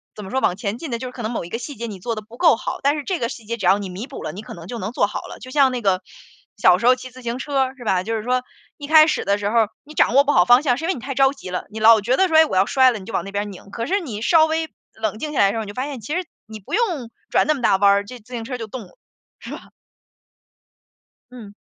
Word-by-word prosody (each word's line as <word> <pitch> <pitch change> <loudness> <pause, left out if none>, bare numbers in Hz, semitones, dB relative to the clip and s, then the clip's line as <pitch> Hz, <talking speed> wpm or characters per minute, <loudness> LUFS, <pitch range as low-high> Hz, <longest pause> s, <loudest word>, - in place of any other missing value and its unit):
怎 210 - -8
么 190 - -9
说， 265 - +1
往 180 - +1
前 200 +2 -4
进 320 +3 -7
的 235 - -1
就 255 +2 -6
是 - - -12
可 245 -2 -8
能 220 - -2
某 230 - -3
一 170 - -9
个 230 - -3
细 280 +4 -7
节 235 +2 -5
你 200 -3 -8
做 230 +5 -3
得 215 - -5
不 225 +3 -15
够 330 -8 +5
好， - - -5
但 285 +2 +2
是 300 - -4
这 365 +2 -2
个 235 - 0
细 235 -1 -8
节 230 +2 -4
只 - - -4
要 190 +3 +4
你 200 -2 -5
弥 190 +7 -7
补 275 - -9
了， - - -4
你 195 - -8
可 - - -10
能 170 -1 -10
就 235 +3 -6
能 210 +3 -5
做 205 - +2
好 - - -5
了。 - - -10
就 255 - -10
像 270 -2 +4
那 245 - -3
个 190 -3 +1 0.5
小 180 -3 +5
时 205 - -4
候 255 - +7
骑 255 0 -10
自 255 +2 -13
行 240 0 -3
车， 270 -2 0
是 245 - -10
吧？ 190 -5 +1
就 225 +3 -2
是 220 - -3
说， 250 +1 0 0.3
一 290 -1 -8
开 310 0 +7
始 - - -1
的 200 +1 +2
时 205 0 -2
候， 225 0 +3 0.2
你 300 +1 -13
掌 255 - +2
握 280 - +7
不 290 - +1
好 175 - +4
方 245 +7 +6
向， 250 -5 +2
是 320 - -4
因 - - -2
为 375 - +1
你 250 - -8
太 275 +3 -4
着 270 +1 +4
急 275 -9 -10
了， 180 - -4
你 220 +1 -7
老 225 0 +7
觉 235 +5 +1
得 380 +4 +2
说： 315 - +4
“哎， 320 - +7
我 245 - -4
要 190 +1 +4
摔 260 +1 +4
了。” 225 - -5
你 - - -11
就 225 - -9
往 - - -1
那 195 - -7
边 205 0 -2
拧。 195 +1 -13
可 230 +2 -4
是 395 - +1
你 235 - -6
稍 315 +6 +5
微 320 0 -2 0.2
冷 220 -1 -3
静 300 +2 -4
下 - - -1
来 200 - +6
的 - - +1
时 225 - -4
候， 220 - -3
你 - - -9
就 - - -7
发 255 - -3
现， 280 -3 -6
其 260 +9 -4
实 365 0 -2 0.2
你 215 -1 -10
不 - - -11
用 350 - 0 0.2
转 - - +3
那 305 - +3
么 275 - -6
大 215 - +4
弯 200 +1 +5
儿， 200 0 +2
这 250 +4 -10
自 235 +3 -16
行 235 -2 -4
车 250 +1 -4
就 225 -2 -6
动 245 +3 -7
了， 180 - -18 0.6
是 - - -5
吧？ - - -16 1.6
嗯。 220 -5 -11
235 Hz, 365 characters per minute, -21 LUFS, 205-275 Hz, 1.6 s, 候